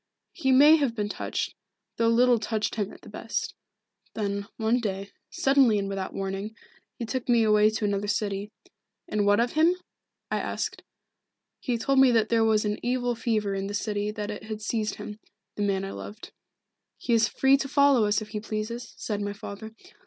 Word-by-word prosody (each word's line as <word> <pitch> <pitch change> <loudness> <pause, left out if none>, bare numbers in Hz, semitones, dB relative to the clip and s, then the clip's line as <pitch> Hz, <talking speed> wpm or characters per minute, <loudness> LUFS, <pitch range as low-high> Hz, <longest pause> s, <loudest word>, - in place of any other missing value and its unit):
He 265 -6 0
may 295 +5 +8
have 275 -6 0
been 210 -2 -2
touched, - - -3 0.4
though 230 - +2
little 240 +1 +4
touched 215 0 -2
him 205 -3 -2
at - - -14
the - - -15
best. - - -4 0.6
Then, 200 -1 -2
one 225 +2 +2
day, 200 -3 -4 0.2
suddenly 270 -5 +3
and 200 -1 -1
without 195 -1 -4
warning, 195 +3 -4 0.4
he 235 - -5
took 250 +3 -4
me 235 -2 +5
away 210 0 +5
to 220 0 -2
another 205 0 -1
city. 200 0 -2 0.6
And 210 -1 0
what 205 +1 +4
of 240 +1 +1
him? 325 +3 +4 0.6
I - - +1
asked. - - -3 0.8
He 245 -2 -1
told 270 +4 +2
me 265 -1 +7
that 220 -2 +2
there 230 -1 +3
was 220 -1 +3
an 210 0 -1
evil 245 0 0
fever 220 -4 -1
in 195 0 -2
the 205 - -4
city 205 0 -2
and 210 - -4
that 210 0 -3
it 210 +1 -8
had 215 -1 -6
seized 215 0 -1
him 210 0 -8 0.3
the - - -5
man 195 -1 0
I 195 - -5
loved. 210 +2 -9 0.7
'He 240 - -1
is 225 -1 +4
free 270 0 +4
to 275 - -3
follow 280 -4 +4
us 210 +1 +1
if 215 - -13
he 215 - -4
pleases,' 220 +3 -5
said 210 -2 -3
my 205 0 -3
father. 215 +1 -9
215 Hz, 195 wpm, -27 LUFS, 205-240 Hz, 0.8 s, may